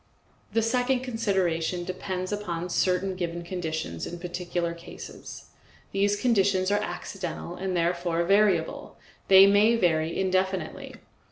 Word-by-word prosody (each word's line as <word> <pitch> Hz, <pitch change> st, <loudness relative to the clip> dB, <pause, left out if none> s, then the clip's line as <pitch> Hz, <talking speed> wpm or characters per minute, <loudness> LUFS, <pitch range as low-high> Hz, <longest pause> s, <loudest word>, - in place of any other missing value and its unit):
The 225 Hz, -, +2 dB
second 250 Hz, +2 st, +1 dB
consideration 190 Hz, -8 st, -1 dB
depends 185 Hz, +1 st, -4 dB
upon 180 Hz, -4 st, -3 dB
certain 185 Hz, +2 st, +1 dB
given 170 Hz, -1 st, -4 dB
conditions 160 Hz, -, -4 dB
in 175 Hz, -, -6 dB
particular 175 Hz, -1 st, -3 dB
cases; 170 Hz, 0 st, -10 dB, 0.4 s
these 205 Hz, +1 st, +1 dB
conditions 200 Hz, -5 st, +2 dB
are 205 Hz, 0 st, +2 dB
accidental 180 Hz, -4 st, -5 dB
and 185 Hz, -1 st, -2 dB
therefore 170 Hz, 0 st, 0 dB
variable; 195 Hz, -3 st, +1 dB, 0.3 s
they 190 Hz, 0 st, +9 dB
may 205 Hz, +3 st, +5 dB
vary 165 Hz, -5 st, +1 dB
indefinitely. 185 Hz, -2 st, -1 dB
185 Hz, 115 wpm, -27 LUFS, 170-200 Hz, 0.4 s, they